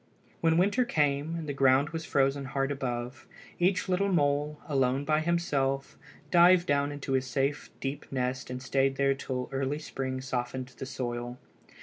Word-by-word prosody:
When 165 0 +3
winter 205 +8 +3
came, 150 - 0
and 165 -2 -5
the 145 - -2
ground 135 +2 +3
was 165 0 -4
frozen 135 0 +1
hard 135 +1 -1
above, 125 -2 -4 0.3
each 185 +2 +2
little 190 +2 +1
mole, 150 -2 +1
alone 135 -1 +1
by 155 0 +2
himself, 145 -5 0 0.4
dived 175 0 +6
down 145 0 +1
into 145 -1 -5
his 130 0 +1
safe 135 +3 -1
deep 135 +2 -5
nest 130 -1 -2
and 125 0 -5
stayed 135 +1 +1
there 140 0 +3
till 130 -2 -4
early 135 +2 -1
spring 130 -3 -4
softened 130 0 -3
the 135 - -5
soil. 120 -2 -4
140 Hz, 160 wpm, -29 LUFS, 130-155 Hz, 0.4 s, dived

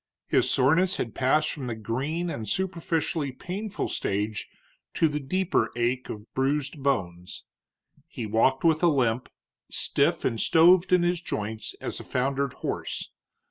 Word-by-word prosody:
His - - +2
soreness 165 +9 +3
had 115 - -3
passed 145 +4 +2
from 135 -4 -5
the 115 - -3
green 140 +11 -2
and 110 -7 -5
superficially 165 - -1
painful 190 +10 -4
stage 105 +2 -2 0.5
to 165 - +4
the 150 -1 -2
deeper 185 +7 0
ache 120 +2 -1
of 105 +1 -8
bruised 140 +2 -1
bones. 90 -10 -2 0.6
He 115 - -6
walked 115 +5 +2
with 160 -2 +3
a 175 - +5
limp, 125 -6 +1 0.4
stiff - - +1
and 115 - 0
stoved 175 +3 +5
in 180 -1 +5
his 175 0 +1
joints 110 -7 -4
as - - -4
a - - -7
foundered 135 +1 -1
horse. - - -3
140 Hz, 145 wpm, -27 LUFS, 115-165 Hz, 0.6 s, a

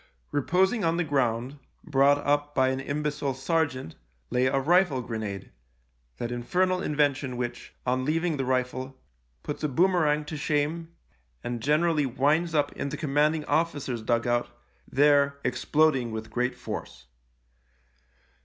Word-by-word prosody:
Reposing 190 - +1
on 165 0 +1
the 175 - +1
ground—brought 135 +1 0
up 145 0 +1
by 130 -1 +3
an 130 0 -1
imbecile 145 -1 -2
sergeant' 135 - -1 0.2
— - - -42
lay 125 +1 +2
a 135 - +1
rifle 155 -2 +3
grenade, 110 -4 -5 0.7
that 120 - -4
infernal 180 +10 0
invention 145 -5 0
which, 120 -1 -5
on 130 +1 0
leaving 160 +2 0
the 135 - -1
rifle, 130 +1 -2 0.4
puts 150 - -5
a - - +2
boomerang 155 -1 +2
to 155 +1 -5
shame 155 +3 -1 0.5
and 120 -1 -4
generally 150 +1 +2
winds 150 +6 +1
up 145 - +2
in 140 - -4
the 150 - -5
commanding 150 +1 +1
officer's 145 -8 -1
dug 115 +1 0
out, 120 0 0 0.4
there 140 0 +4
exploding 130 0 +1
with 110 0 -6
great 125 +2 -1
force. 60 0 -7
140 Hz, 135 wpm, -27 LUFS, 125-155 Hz, 0.7 s, there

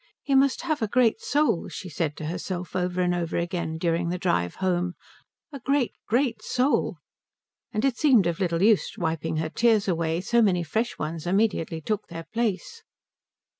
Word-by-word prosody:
"He 280 - -1
must 270 0 +4
have 315 -5 -1
a 220 - +1
great 230 0 +2
soul," 290 - +1
she 190 - -7
said 155 -2 -2
to 155 - -5
herself 180 +2 -4
over 180 0 0
and 180 0 +1
over 170 -2 -2
again 170 -2 -2
during 170 0 0
the 180 - -1
drive 90 - 0
home, 180 -1 -1 0.6
"a 280 - -7
great, 275 0 +1
great 245 +2 +1
soul." 255 +3 +1 0.7
And 215 +4 0
it 260 -3 +1
seemed 255 - +5
of 170 -1 -1
little 175 -2 0
use 215 -1 +3
wiping 160 -1 -2
her 160 0 -1
tears 225 -3 +3
away, 165 -2 0
so 235 +5 +2
many 185 -5 +3
fresh 220 +9 -2
ones 160 +2 -4
immediately 185 -4 +1
took 210 +6 -2
their 165 -1 -7
place. 235 - -2
185 Hz, 175 wpm, -26 LUFS, 170-235 Hz, 0.7 s, seemed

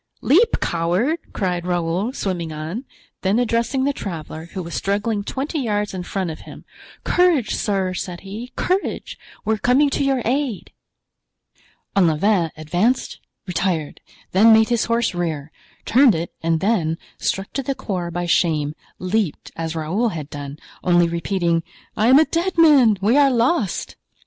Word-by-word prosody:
"Leap, 410 - +4
coward!" 180 - 0
cried 180 -3 -2
Raoul, 175 +5 0
swimming 180 - -3
on; 160 - -5 0.4
then 195 +3 +1
addressing 240 +2 +1
the 285 +1 +1
traveler, 160 - -6
who 185 - -4
was 170 - -8
struggling 205 +1 -1
twenty 275 +8 -3
yards 210 -5 -1
in 185 - -4
front 180 -1 -3
of 155 - -8
him: - - -12 0.4
"Courage, 345 -11 +2
sir!" 195 -3 -1
said 180 -1 -5
he, 215 +6 -8
"courage! 375 +2 -2 0.3
we 220 - +2
are - - -1
coming 275 +5 +3
to - - 0
your 270 -3 +1
aid." 255 -4 -1 1.2
Olivain 175 0 +3
advanced, 175 +11 0 0.3
retired, 175 -4 -2 0.3
then 215 +5 +6
made 220 +1 +5
his 235 -2 +1
horse 230 -2 +1
rear—turned 175 - +1
it 165 +1 -4
and 165 -1 0
then, 175 -7 +1 0.2
struck 195 +1 -2
to 275 - -1
the 275 +1 -2
core 180 -7 -3
by 175 +1 -3
shame, 155 -4 +1 0.2
leaped, 185 -2 -2
as 165 0 -4
Raoul 180 +10 0
had 155 -6 -6
done, 145 0 -7 0.3
only 175 -1 +4
repeating: 170 0 0 0.3
"I 215 - +2
am 260 +2 +7
a 315 - +6
dead 340 +3 -1
man! 275 -10 +6
we 220 +7 +3
are 285 -1 +6
lost!" 240 - 0
195 Hz, 155 wpm, -21 LUFS, 170-245 Hz, 1.2 s, am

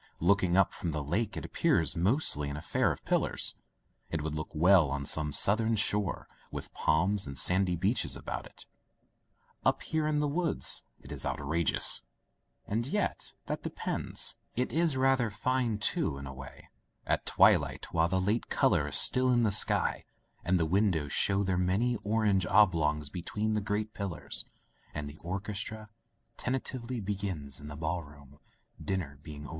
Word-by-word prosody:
Looking 90 0 +3
up 95 - +3
from 85 -3 -4
the 75 -2 -3
Lake, 100 +10 -2
it - - -5
appears 80 -5 +1
mostly 85 - +1
an 70 - -5
affair - - 0
of - - -8
pillars. - - +1 0.6
It 80 -3 -3
would 80 0 -3
look 75 +1 -4
well 85 -1 +5
on 70 0 -3
some 75 +1 -1
Southern 110 +8 +4
shore, 105 -2 -1 0.2
with - - -7
palms 95 +5 +1
and 70 0 -7
sandy 90 +4 +2
beaches 100 +7 0
about - - -6
it. - - -13 1.0
Up - - +1
here 155 -1 -1
in 155 -1 +1
the 150 - +1
woods 165 +3 -1 0.2
it - - -12
is - - -5
outrageous— 75 +2 +2 0.6
and 115 +4 -2
yet, 205 +7 -2
that - - -4
depends. - - -1 0.2
It 125 +1 -1
is 160 -4 +2
rather 130 -3 +2
fine, 120 +1 -1
too, 150 - 0
in 70 - -7
a 65 - -7
way, 65 -1 -12 0.4
at - - -1
twilight, - - +3
while 80 0 +3
the 95 +2 0
late 105 +5 -1
color - - +2
is - - -2
still 130 0 +7
in 120 -1 +3
the 110 - +2
sky, 105 - +2 0.4
and 90 +1 +2
the 80 - +2
win 100 +6 +2
dows 75 -6 -2
show 100 0 +2
their 95 -2 0
many 100 +7 +1
orange 105 -4 +1
oblongs 80 -7 +3
be 90 - -5
tween 110 +5 -2
the 105 - 0
great 105 +1 -2
pillars, 85 - -5 0.5
and 75 -1 -4
the 75 +2 -10
orchestra 105 +4 -5 0.5
tentatively 125 -1 -3
begins 95 - -4
in 75 - -10
the 75 - -7
ballroom, 75 -3 -6 0.4
dinner 80 -8 -3
being 75 -1 -9
over. - - -9
95 Hz, 170 wpm, -30 LUFS, 75-110 Hz, 1.0 s, still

